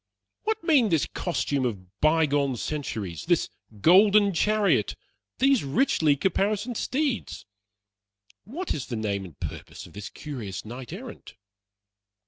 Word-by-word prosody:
What 440 -2 -1
mean 285 -10 +4
this 160 -5 +2
costume 145 -6 -2
of 100 -5 -5
by 160 +1 +4
gone 140 -3 0
centuries 110 - -4
this - - +2 0.3
golden 200 - +6
chariot 210 +4 +2 0.4
these 270 -2 +3
richly 155 - +2
caparisoned 205 - 0
steeds? 270 +1 -2 1.0
What 315 - -4
is 140 - -5
the 120 - -4
name 100 -3 -2
and 85 -6 -14
purpose - - -7
of - - -15
this 100 0 -7
curious 115 -12 -7
knight 120 +2 -8
errant? - - -9
155 Hz, 125 wpm, -26 LUFS, -, 1.0 s, golden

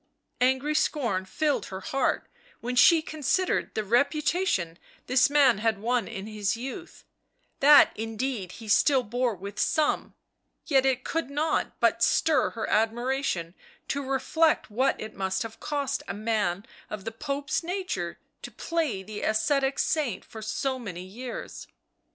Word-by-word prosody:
Angry 265 +4 +2
scorn 235 - 0
filled 295 +9 -1
her 190 0 -7
heart 270 +7 -1 0.3
when 245 +2 -4
she 320 +6 +6
considered 315 +5 0
the 215 - 0
reputation 250 - +1 0.3
this 255 +1 +4
man 275 -7 +4
had 220 -1 +1
won 235 +3 0
in 200 -4 -6
his 210 0 -2
youth 270 +9 -8 0.3
— - - -49 0.2
that 290 +1 +8
indeed 225 -3 -4
he 225 - -10
still 265 +5 +4
bore 245 0 -1
with 200 +2 -8
some 310 -2 +1 0.2
— - - -51
yet 270 -3 +3
it 260 -1 +1
could 330 -4 -2
not 300 +3 -1
but - - +2
stir 320 -3 +3
her 225 - -4
admiration 225 -5 0 0.4
to 280 - -1
reflect 275 +2 +1
what 255 +6 +1
it 215 - -7
must 190 +1 -1
have 225 -1 -9
cost 280 -2 -2
a 195 - -4
man 205 -3 -1 0.2
of 210 -2 -6
the 225 - -3
Pope's 285 +5 -2
nature 345 - -3 0.2
to - - -7
play 320 - -2
the 210 +2 -7
ascetic 270 +5 +1
saint 280 - 0
for 220 - -10
so 260 +4 -2
many 180 -7 -6
years. 235 +7 -7
250 Hz, 150 wpm, -27 LUFS, 210-285 Hz, 0.4 s, that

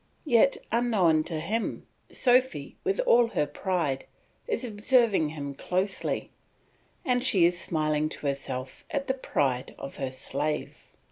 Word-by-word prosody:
Yet 275 0 +4
unknown 195 -10 +3
to 165 -2 -3
him, 215 +8 -2 0.3
Sophy, 250 - +2
with 395 +4 0
all 240 - +5
her 150 -9 0
pride, 145 -3 -2 0.4
is 445 - -1
observing 215 - +2
him 145 -2 -5
closely, 185 +7 -2 0.7
and 245 -1 +1
she 190 -9 +5
is 175 0 +2
smiling 155 -1 0
to 150 - -8
herself 135 -2 -4
at 280 -1 -2
the 265 - 0
pride 135 - -1
of 135 - -8
her 135 -2 -2
slave. 140 +3 -4
175 Hz, 135 wpm, -27 LUFS, 145-240 Hz, 0.7 s, all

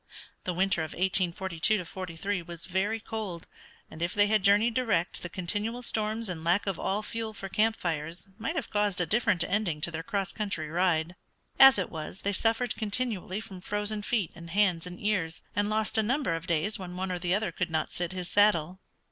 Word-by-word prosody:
The 180 - -1
winter 190 -2 +2
of 160 - -4
1842 185 +1 +1
43 185 +2 -3
was 170 0 -8
very 195 +4 0
cold, 210 -6 -5 0.4
and 160 - -11
if 170 +1 -1
they 205 0 +5
had 210 -1 +2
journeyed 210 +4 +5
direct 220 -8 0
the 175 - -5
continual 205 +7 -2
storms 220 0 0
and 170 -4 -5
lack 175 +4 +2
of 195 -4 -2
all 205 +3 -1
fuel 225 0 -4
for 195 - -6
camp 220 +3 +2
fires 165 +1 -4
might 230 +10 -2
have 320 - -3
caused 205 -3 +1
a 175 - +2
different 205 -3 +2
ending 185 -6 0
to 170 - +1
their 160 0 -3
cross 195 +3 -2
country 195 -8 -3
ride. 175 0 +1 0.4
As 270 -3 +10
it 190 - -2
was 160 +3 -6
they 200 - -1
suffered 225 +4 +1
continually 210 -3 -2
from 195 -5 -9
frozen 210 +2 0
feet 205 -4 0
and 170 0 -10
hands 180 -2 +2
and 180 0 -8
ears, 180 -6 -1
and 205 +1 +1
lost 215 +1 +1
a - - +6
number 250 - 0
of 165 +2 -4
days 170 +6 0
when 180 -1 -7
one 190 0 -2
or 180 - -2
the 175 +1 +1
other 210 -3 -1
could 175 +1 -2
not 160 -1 -1
sit 175 0 -3
his 180 -1 -5
saddle. 185 -3 +3
190 Hz, 205 wpm, -29 LUFS, 175-215 Hz, 0.4 s, As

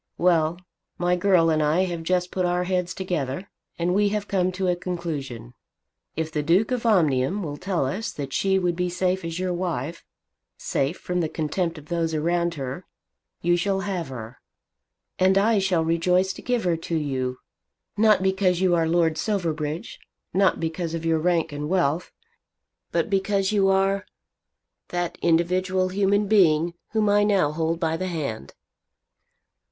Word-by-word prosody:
Well, 170 -2 +2 0.4
my 175 0 +2
girl 175 -3 +3
and 155 -1 +2
I 155 +4 +2
have 175 -3 -2
just 180 +1 0
put 185 - -1
our 180 0 +1
heads 180 -1 -1
together, 175 -2 -3 0.3
and 175 +1 0
we 205 +1 +3
have 205 0 -2
come 185 -2 +1
to 185 0 -1
a 180 - +2
conclusion. 155 -10 -5 0.6
If 160 0 -2
the 150 - -1
Duke 180 +10 +2
of 245 -2 0
Omnium 170 - +2
will 145 -3 -4
tell 180 -4 -1
us 205 +12 -3
that 135 -2 -6
she 190 0 +2
would 180 -2 0
be 180 +1 -1
safe 180 +1 0
as 165 0 -4
your 185 0 -1
wife, 170 -3 -3 0.5
safe 140 +6 -1
from 180 0 -3
the 160 -3 0
contempt 165 +2 -2
of 150 0 -13
those 165 -2 -1
around 170 +2 0
her, 135 +5 -6 0.6
you 175 +1 +3
shall 195 +2 0
have 190 -4 -3
her. 120 -2 -9 0.8
And 190 +1 +4
I 210 +2 +3
shall 185 -4 +1
rejoice 180 +3 +2
to - - -10
give 245 -2 0
her 175 -2 +1
to 165 +1 -4
you, 130 -4 -2 0.6
not 215 -2 +4
because 190 -2 +2
you 185 -1 +3
are 165 -1 +2
Lord 165 -2 +2
Silverbridge, 160 -5 -2 0.3
not 195 0 +3
because 165 0 -3
of 165 0 -5
your 165 -1 +2
rank 165 -1 +1
and 145 +1 -4
wealth; 175 -3 0 0.8
but - - +1
because 195 -1 +1
you 200 -2 +3
are 195 +1 +1 0.8
that 175 -1 -3
individual 185 +2 +2
human 200 +2 +2
being 170 -5 +3 0.2
whom 215 -1 +2
I 205 0 +4
now 195 -8 +2
hold 165 +1 -1
by 160 -2 0
the 185 - -3
hand." 140 - -4
175 Hz, 170 wpm, -24 LUFS, 160-190 Hz, 0.8 s, And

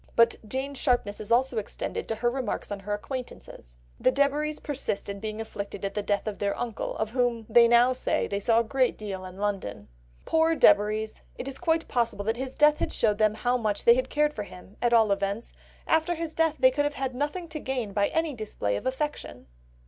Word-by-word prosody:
But 230 0 +4
Jane's 265 +3 -3
sharpness 245 -7 +1
is 215 - -6
also 245 0 +3
extended 205 - -5
to 225 - -2
her 240 +2 0
remarks 255 -6 -3
on 205 - -3
her 205 +1 -4
acquaintances. 210 - -8 0.2
"The 255 - +4
Debaries 290 +2 +1
persist 280 -8 -3
in 200 0 -5
being 215 +1 -5
afflicted 200 -3 -5
at 195 - -3
the 210 - -1
death 205 0 -1
of 215 -2 -4
their 200 -1 -1
uncle, 235 -3 -4
of 220 0 -2
whom 240 -2 0
they 235 +1 +6
now 240 +2 +5
say 255 - 0
they 200 - -2
saw 230 +3 +3
a - - -2
great 255 +2 +1
deal 195 -3 -5
in 185 0 -10
London." 195 - -3 0.4
Poor 325 0 +3
Debaries, 215 -8 +3 0.2
it 260 - -6
is 270 -1 -5
quite 325 -2 +1
possible 230 -4 -1
that 225 +2 0
his 265 +1 -5
death 300 0 +5
had - - -1
showed 210 -2 +1
them 215 -1 +3
how 245 +3 +1
much 215 -4 -2
they 235 - +9
had 255 +1 -1
cared 300 0 +1
for 215 - -4
him, 195 0 -11
at 240 - +2
all 225 -3 +5
events, 200 +3 -2 0.3
after 320 +2 +2
his 325 -1 -4
death 325 -1 +2
they 260 - +5
could 290 +3 0
have 290 0 -2
had 265 -1 -2
nothing 295 +7 -3
to 310 -1 -5
gain 250 -7 -3
by 200 0 +2
any 320 -2 -1
display 210 - -3
of - - -3
affection! 265 - -4
235 Hz, 220 wpm, -27 LUFS, 210-275 Hz, 0.4 s, they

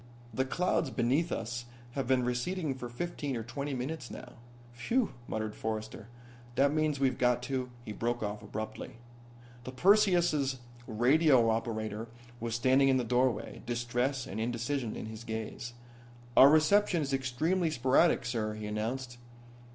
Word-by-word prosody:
The 130 +4 0
clouds 170 0 0
beneath 130 +7 +1
us 120 +1 -3 0.3
have 135 0 -3
been 130 -1 +2
receding 140 +6 -1
for 125 -2 -7
fifteen 145 0 -3
or 115 - -4
twenty 140 +4 -4
minutes 130 +1 -4
now." - - -9 0.4
"Phew!" 220 - 0
muttered 110 -1 -3
Forrester. 110 0 -5 0.5
"That 140 +1 +3
means 155 -2 +1
we've 135 -2 +1
got 125 -1 +2
to 130 -1 -2
" 120 - -21
He 105 - -5
broke 120 +3 -2
off 105 0 -3
abruptly. 110 +1 -6 0.7
The 130 - -6
Perseus' 175 -5 +3 0.3
radio 125 +1 +4
operator 110 -1 -3 0.3
was 115 0 -3
standing 130 +3 +4
in 130 - +4
the 125 - 0
doorway, 125 +1 0
distress 120 +3 -1
and 100 - -6
indecision 120 +1 -2
in - - -5
his 110 +1 -8
gaze. 110 +2 -5 0.6
"Our 135 - +9
reception 165 +3 +4
is 140 -1 -3
extremely 155 +7 0
sporadic, 130 +1 +3
sir," 110 -3 -2
he 110 0 -6
announced. 120 +4 -3
125 Hz, 150 wpm, -31 LUFS, 115-140 Hz, 0.7 s, Our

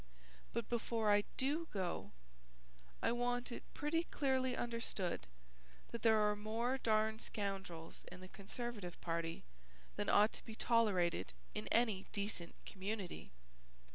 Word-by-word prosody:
But 230 -1 -1
before 225 -2 +2
I 205 0 +5
do 300 +5 +1
go, 185 -4 -2 0.9
I - - +4
want 245 +1 0
it - - -4
pretty 325 +3 +1
clearly 260 -4 +1
understood 220 - -1 0.6
that 235 - -4
there 220 -1 +6
are 210 -1 +4
more 230 +5 0
darn 220 -1 +3
scoundrels 195 -7 -4
in 180 - -8
the 185 - -8
Conservative 205 -1 -5
party 165 -1 -2 0.5
than - - 0
ought 210 +2 +6
to - - -5
be 225 - -7
tolerated 195 - +3 0.2
in 105 - -3
any 220 - +3
decent 200 -4 -2
community. 195 -1 -4
215 Hz, 130 wpm, -39 LUFS, 190-240 Hz, 0.9 s, there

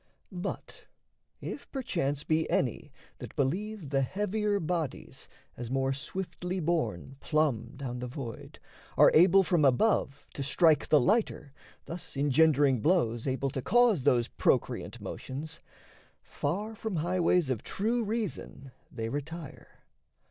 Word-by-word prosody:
But, 180 -2 -6 0.6
if - - -7
perchance 165 - -2
be 160 0 0
any 135 +3 -1 0.3
that - - -9
believe 175 +4 -2
The 135 -1 +2
heavier 205 +6 0
bodies, 165 -4 -4 0.3
as 120 -1 -6
more 135 +1 0
swiftly 180 +5 -4
borne 150 - -2
Plumb 150 -8 0
down 125 -3 -5
the 125 - -4
void, 120 -3 -8 0.4
are - - +7
able 185 +4 +6
from 175 -4 +2
above 140 - +2
To - - -5
strike 155 +3 +3
the 150 - +6
lighter, 190 - 0 0.3
thus 165 -4 -7
engendering 140 -2 +3
blows 120 - +1
Able 135 +1 -1
to 130 - -3
cause 230 - +4
those 125 -3 +3
procreant - - 0
motions, 155 +5 -7 0.6
far 210 +5 -3
From 220 -2 -4
highways 175 -2 +2
of 115 -4 -2
true 230 +4 -1
reason 205 - -4 0.2
they 115 -2 -4
retire. 145 +4 -7
155 Hz, 125 wpm, -29 LUFS, 135-185 Hz, 0.6 s, are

